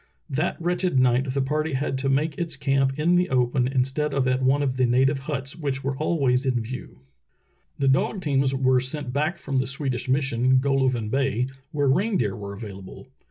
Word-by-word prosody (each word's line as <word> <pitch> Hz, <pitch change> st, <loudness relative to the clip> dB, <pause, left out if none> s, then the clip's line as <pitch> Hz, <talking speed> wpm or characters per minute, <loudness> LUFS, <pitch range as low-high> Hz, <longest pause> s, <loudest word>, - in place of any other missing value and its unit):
That -, -, -1 dB
wretched 175 Hz, -3 st, 0 dB
night 130 Hz, +1 st, +2 dB
the 135 Hz, 0 st, 0 dB
party 155 Hz, +3 st, -1 dB
had 135 Hz, +1 st, -1 dB
to 135 Hz, +1 st, -1 dB
make 145 Hz, +3 st, +1 dB
its 165 Hz, -4 st, -3 dB
camp 135 Hz, -1 st, +1 dB
in 170 Hz, +4 st, +3 dB
the 180 Hz, +1 st, +1 dB
open 125 Hz, 0 st, +1 dB
instead 135 Hz, +3 st, -1 dB
of 135 Hz, -2 st, +1 dB
at 130 Hz, 0 st, +1 dB
one 135 Hz, +2 st, +2 dB
of 130 Hz, -2 st, -1 dB
the 130 Hz, -, +3 dB
nativ^e 135 Hz, +3 st, +2 dB
huts 135 Hz, +1 st, -4 dB
which 140 Hz, -5 st, -3 dB
were 135 Hz, 0 st, -1 dB
always 135 Hz, -4 st, +1 dB
in 130 Hz, -3 st, +1 dB
view.. 115 Hz, -, -7 dB, 0.8 s
The 140 Hz, -, 0 dB
dog 135 Hz, +9 st, +2 dB
teams 135 Hz, -4 st, +1 dB
were 130 Hz, -1 st, +2 dB
sent 130 Hz, 0 st, -3 dB
back 155 Hz, +5 st, 0 dB
from 140 Hz, -4 st, -3 dB
the 130 Hz, 0 st, +1 dB
Swedish 135 Hz, -2 st, -2 dB
mission, 130 Hz, -1 st, +2 dB
Golovin 130 Hz, -5 st, +1 dB
Bay, 135 Hz, -2 st, +1 dB, 0.3 s
where 145 Hz, -2 st, 0 dB
reindeer 140 Hz, -, +1 dB
were 100 Hz, -1 st, -7 dB
available. 100 Hz, +3 st, -10 dB
135 Hz, 190 wpm, -24 LUFS, 130-145 Hz, 0.8 s, in